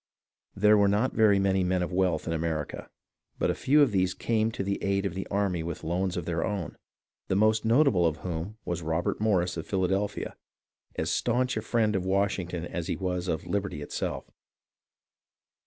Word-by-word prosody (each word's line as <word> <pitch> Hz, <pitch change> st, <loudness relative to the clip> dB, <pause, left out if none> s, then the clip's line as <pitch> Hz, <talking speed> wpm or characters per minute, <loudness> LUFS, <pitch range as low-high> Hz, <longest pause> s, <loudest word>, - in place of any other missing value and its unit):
There 105 Hz, +1 st, +5 dB
were 100 Hz, -, +5 dB
not 105 Hz, +6 st, +1 dB
very 105 Hz, -3 st, +5 dB
many 95 Hz, -1 st, +2 dB
men 90 Hz, 0 st, +1 dB
of 90 Hz, -, -4 dB
wealth 90 Hz, -3 st, +1 dB
in 85 Hz, -, -2 dB
America, 80 Hz, -2 st, -3 dB, 0.5 s
but -, -, +1 dB
a -, -, 0 dB
few 145 Hz, +2 st, +4 dB
of 135 Hz, -, +2 dB
these 95 Hz, -2 st, +1 dB
came 110 Hz, -1 st, +1 dB
to 100 Hz, -, -3 dB
the 100 Hz, +1 st, -2 dB
aid 100 Hz, 0 st, +1 dB
of 95 Hz, -, -2 dB
the 95 Hz, +1 st, -5 dB
army 100 Hz, -4 st, 0 dB
with 85 Hz, 0 st, -5 dB
loans 90 Hz, +2 st, -1 dB
of 85 Hz, -, -3 dB
their 85 Hz, -1 st, -1 dB
own, 100 Hz, -7 st, -3 dB, 0.5 s
the -, -, 0 dB
most 110 Hz, +2 st, +3 dB
notable 115 Hz, -, +4 dB
of 80 Hz, -1 st, -2 dB
whom 90 Hz, +5 st, -4 dB
was 85 Hz, -1 st, -2 dB
Robert 80 Hz, +5 st, -1 dB
Morris 90 Hz, -5 st, +1 dB
of 80 Hz, -, -5 dB
Philadelphia, 95 Hz, +1 st, -1 dB, 0.6 s
as -, -, -1 dB
stanch 125 Hz, +2 st, +1 dB
a -, -, -1 dB
friend 110 Hz, -3 st, +1 dB
of 95 Hz, -, 0 dB
Washing 95 Hz, -1 st, 0 dB
ton 85 Hz, -1 st, -4 dB
as 85 Hz, -1 st, -4 dB
he -, -, -1 dB
was 90 Hz, -1 st, -2 dB
of 80 Hz, -2 st, -2 dB
liberty 95 Hz, -5 st, -2 dB
itself. -, -, -4 dB
95 Hz, 190 wpm, -28 LUFS, 85-105 Hz, 0.6 s, There